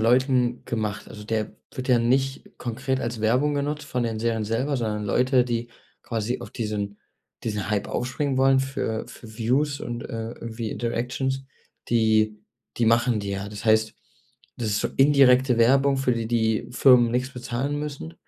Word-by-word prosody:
Leuten 125 +1 +2
gemacht. 110 -3 -3
Also, 105 -1 -10
der 110 0 -2 0.2
wird 130 0 -5
ja 125 -2 +5
nicht 130 +3 +1
konkret 130 +2 -2
als 115 -2 -3
Werbung 125 +7 +2
genutzt 145 +1 -2
von 125 -3 -2
den 115 -2 -2
Serien 115 -1 0
selber, 125 +7 -1
sondern 105 -3 -2
Leute, 125 +5 +3
die 120 -1 -2 0.3
quasi 115 +1 -2
auf - - -8
diesen 105 -3 -3 0.4
diesen 105 -3 -3
Hype 105 -1 0
aufspringen 130 +2 -2
wollen 135 0 +4
für 130 -4 -2
für 110 -2 -12
Views 140 +5 +1
und, 120 0 -5
äh, 115 0 -5
irgendwie 115 -1 -6
Interactions, 130 +3 -2 0.4
die 110 -2 +2 0.4
die 120 - +2
machen 115 0 +3
die 100 -1 -4
ja. 100 +1 -3
Das 105 +1 -8
heißt, 110 0 +3 0.6
das 115 - -2
ist 100 -1 +1
so - - 0
indirekte 135 -2 +5
Werbung, 135 +4 +4
für 135 -1 +1
die 115 -1 -2
die 110 -2 +1
Firmen 125 -2 +5
nix 125 +2 -1
bezahlen 125 +4 -3
müssen. 140 - -6
120 Hz, 165 wpm, -25 LUFS, 110-130 Hz, 0.6 s, ja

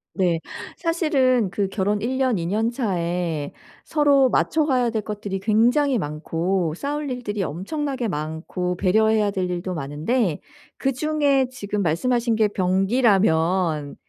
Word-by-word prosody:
네. 175 -4 +1 0.4
사실은 275 - +1
그 195 +1 -1
결혼 205 +1 0
1 255 +4 -1
년 255 -5 +2
2 170 - -3
년 215 +6 0
차에 175 - -2 0.3
서로 285 -4 +3
맞춰 315 +5 +2
가야 250 -5 +1
될 220 -1 -1
것들이 205 -2 -5
굉장히 240 +7 +3
많고 165 +1 -2
싸울 290 - -3
일들이 230 -5 -3
엄청나게 250 - -3
많고 165 +3 -3
배려해야 215 +2 +2
될 185 -2 -2
일도 180 +1 -3
많은데 160 - -1 0.4
그중에 280 0 +1
지금 210 -5 -4
말씀하신 230 +8 +1
게 215 -1 +3
변기라면 185 - +1
210 Hz, 260 characters per minute, -23 LUFS, 180-255 Hz, 0.4 s, 서로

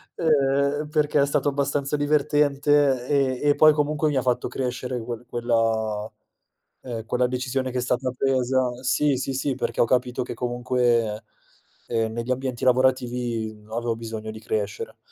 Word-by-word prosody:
ehm, 145 -1 +1
perché 150 -2 +2
è - - +4
stato 140 - 0
abbastanza 140 0 0
divertente 145 -2 +2
e 135 -3 +1
e 145 - +5
poi 155 0 +7
comunque 150 +1 0
mi 145 - 0
ha 130 - +2
fatto 125 -1 0
crescere 125 -1 -3
quel 120 +1 -6
quella, 115 -3 -1 0.7
ehm, 115 -3 -6
quella 125 +2 +1
decisione 130 +1 -2
che 130 - -3
è - - 0
stata 125 +1 -1
presa 130 -1 +1
Sì, 145 +2 +2
sì, 135 +1 -3
sì, 135 0 -1
perché - - -3
ho - - +5
capito 125 0 0
che - - -6
comunque, 120 -3 0 0.6
ehm, 115 -1 0
negli 120 +2 -3
ambienti 130 -1 -2
lavorativi 120 -4 +1
avevo 115 0 -1
bisogno 110 -1 -6
di 110 - -9
crescere, 105 -2 -3
125 Hz, 155 wpm, -24 LUFS, 120-140 Hz, 0.7 s, poi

